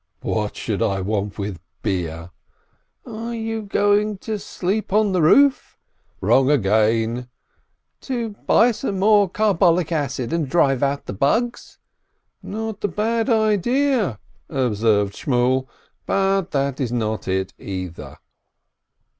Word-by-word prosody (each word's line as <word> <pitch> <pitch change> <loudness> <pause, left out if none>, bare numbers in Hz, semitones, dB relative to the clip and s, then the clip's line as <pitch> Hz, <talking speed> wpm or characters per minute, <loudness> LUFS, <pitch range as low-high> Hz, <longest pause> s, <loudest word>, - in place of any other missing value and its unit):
"What - - -2
should - - -3
I 95 0 +1
want 100 +1 -2
with 100 -4 -4 0.2
beer 85 -4 -3 0.4
?" - - -45
"Are 230 0 -5
you 225 0 -3
going 205 0 +1
to 220 -2 -2
sleep 195 +2 -3
on 210 0 +3
the 185 -2 +1
roof?" 275 - +4 0.4
"Wrong 135 0 +3
again 115 0 +1 0.3
!" - - -51
"To 240 -4 -3
buy 225 +3 +3
some 210 -3 -3
more 205 0 +4
carbolic 180 -4 +2
acid, 145 -4 -2
and 160 -5 -1
drive 135 -5 +2
out 140 0 0
the - - -5
bugs?" 225 - -1 0.6
"Not 220 0 -5
a - - +3
bad 225 +6 -1
idea," 220 - +2 0.3
observed 110 -6 +1
Shmuel, 130 +1 0 0.4
"but 195 -1 +1
that 140 -2 -1
is 125 -4 -1
not 110 -3 -2
it, 95 0 -1
either." 95 -3 -7
165 Hz, 130 wpm, -21 LUFS, -, 0.6 s, roof